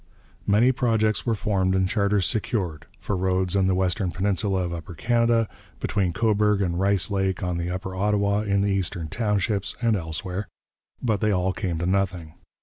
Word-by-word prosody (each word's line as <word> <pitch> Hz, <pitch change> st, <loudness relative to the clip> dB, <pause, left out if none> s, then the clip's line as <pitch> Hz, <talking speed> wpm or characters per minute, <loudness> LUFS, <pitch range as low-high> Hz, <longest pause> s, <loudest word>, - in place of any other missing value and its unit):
Many 110 Hz, +6 st, +5 dB
projects 110 Hz, -3 st, +1 dB
were 115 Hz, -, +2 dB
formed 95 Hz, -3 st, 0 dB
and 95 Hz, 0 st, +2 dB
charters 100 Hz, -1 st, +1 dB
secured 95 Hz, -9 st, -2 dB
for 100 Hz, -, -2 dB
roads 95 Hz, 0 st, 0 dB
in 95 Hz, -1 st, +3 dB
the 95 Hz, -, +2 dB
western 95 Hz, +1 st, 0 dB
peninsula 95 Hz, +1 st, 0 dB
of 85 Hz, -1 st, -3 dB
Upper 85 Hz, +1 st, -7 dB
Canada, 115 Hz, +4 st, +2 dB, 0.3 s
between 95 Hz, -5 st, 0 dB
Cobourg 105 Hz, +1 st, +2 dB
and 90 Hz, -3 st, 0 dB
Rice 100 Hz, +1 st, +1 dB
Lake, 95 Hz, -2 st, 0 dB
on 90 Hz, -1 st, -1 dB
the 85 Hz, +1 st, -2 dB
Upper 95 Hz, +1 st, -4 dB
Ottawa, 100 Hz, +1 st, +1 dB
in 100 Hz, -2 st, +1 dB
the 100 Hz, 0 st, +1 dB
Eastern 90 Hz, -4 st, -2 dB
Townships, 105 Hz, 0 st, 0 dB
and 115 Hz, -2 st, +2 dB
elsewhere 90 Hz, +3 st, -4 dB, 0.6 s
but 110 Hz, -5 st, +1 dB
they 105 Hz, -, +2 dB
all 95 Hz, -1 st, +1 dB
came 90 Hz, -5 st, -2 dB
to 85 Hz, -, -2 dB
nothing. 90 Hz, -4 st, -1 dB
100 Hz, 175 wpm, -25 LUFS, 90-105 Hz, 0.6 s, Many